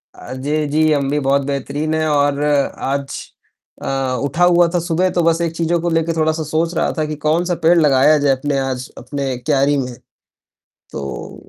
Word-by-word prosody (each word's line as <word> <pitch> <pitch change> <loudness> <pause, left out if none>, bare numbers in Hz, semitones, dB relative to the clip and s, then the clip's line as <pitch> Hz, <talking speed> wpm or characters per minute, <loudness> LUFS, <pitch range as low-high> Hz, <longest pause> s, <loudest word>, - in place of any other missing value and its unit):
अ, 125 - -9
जे 150 +4 -1
जी, 155 +2 +2
हम 140 -2 0
भी 145 +1 0
बहुत 140 +1 +3
बेहतरीन 140 +2 -2
हैं 155 0 0
और 145 -1 +1
आज 140 -1 -1 0.5
अ, 135 -1 -1
उठा 155 +5 0
हुआ 175 -1 +5
था 175 - +2
सुबह, 175 +2 0
तो 175 - 0
बस 165 0 +2
एक 170 -1 0
चीज़ों 170 +1 0
को 175 - -1
लेकर 165 0 0
थोड़ा-सा 160 0 0
सोच 160 +3 -1
रहा - - +1
था 155 - 0
कि 150 0 -4
कौन-सा 170 +4 +1
पेड़ 170 +2 +5
लगाया 150 0 +4
जाए 145 -1 +2
अपने 140 +1 -2
आज 130 -1 -3
अपने 140 -3 -4
क्यारी 140 +2 +1
में। 125 -2 -3 1.0
तो 70 -1 -7
150 Hz, 190 wpm, -18 LUFS, 140-165 Hz, 1.0 s, हुआ